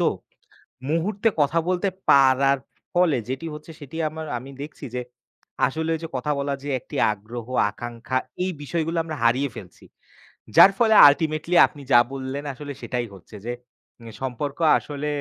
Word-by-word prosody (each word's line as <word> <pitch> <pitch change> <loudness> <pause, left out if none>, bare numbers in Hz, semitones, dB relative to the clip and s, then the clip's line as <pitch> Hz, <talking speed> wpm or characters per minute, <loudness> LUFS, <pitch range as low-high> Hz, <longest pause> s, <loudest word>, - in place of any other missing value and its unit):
তো, - - +2 0.9
মুহূর্তে 190 +7 0
কথা 145 +3 +1
বলতে 185 +2 +1 0.2
পারার 135 0 +5 0.4
ফলে 175 -5 +3
যেটি 135 +5 -4
হচ্ছে, 150 +2 -11
সেটি 145 0 -11
আমার 160 +1 -7
আমি 130 +3 -9
দেখছি 150 +1 -9
যে, 125 - -1 0.6
আসলে 160 +3 -2
ঐযে 165 +1 -6
কথা 130 +4 -1
বলার 140 0 -2
যে 145 - -5
একটি - - -12 0.2
আগ্রহ, 110 +3 -8 0.2
আকাঙ্খা 120 +3 -4 0.3
এই 185 - 0
বিষয়গুলো 165 +3 -2
আমরা 160 -1 -5
হারিয়ে 130 +4 +2
ফেলছি। 90 -4 -11 0.7
যার 195 - +9
ফলে 225 -2 +4 0.2
ultimately 155 +3 -1
আপনি 145 - -14
যা 120 - +8
বললেন, 135 +1 -4
আসলে 145 +1 -7
সেটাই 125 -2 -2
হচ্ছে, 95 +3 -15
যে 120 - -2 0.5
নে 115 - -9
সম্পর্ক 135 +3 -3 0.2
আসলে 145 0 -6
140 Hz, 155 wpm, -24 LUFS, 130-160 Hz, 0.9 s, যার